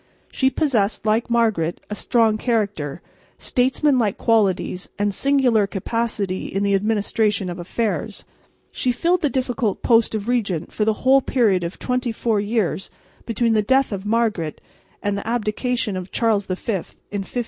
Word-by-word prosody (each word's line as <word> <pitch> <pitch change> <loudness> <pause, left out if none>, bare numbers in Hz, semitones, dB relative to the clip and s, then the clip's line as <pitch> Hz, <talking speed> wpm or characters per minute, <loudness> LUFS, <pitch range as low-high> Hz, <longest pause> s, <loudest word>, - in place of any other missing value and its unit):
She 265 - +2
possessed, 235 -10 0
like 220 +3 +1
Margaret, 220 -8 +1
a - - 0
strong 225 0 +2
character, 205 - -1 0.3
statesmanlike 255 -4 +1
qualities 200 -4 +1
and 205 0 0
singular 250 -4 +3
capacity 200 -1 -2
in 195 +1 -2
the 200 0 +2
administration 205 -1 +1
of 175 - -7
affairs. 210 +5 -3 0.5
She 255 - 0
filled 345 +7 +1
the 295 - +2
difficult 250 -6 -1
post 230 -2 +3
of 210 0 -4
regent 200 -9 -1
for 210 - 0
the 220 +3 -1
whole 270 +1 +6
period 215 -10 +2
of 170 +2 -5
twenty 250 -1 -1
four 225 -1 0
years 205 -3 -1 0.4
between 230 0 +1
the 215 - +3
death 265 +5 +2
of 195 -2 -4
Margaret 210 -7 0 0.4
and 205 0 0
the - - -8
abdication 235 0 -1
of 185 0 -5
Charles 215 -4 +1
V 185 - -1
in 200 0 -5
1555. 195 - -8
220 Hz, 155 wpm, -22 LUFS, 200-240 Hz, 0.5 s, whole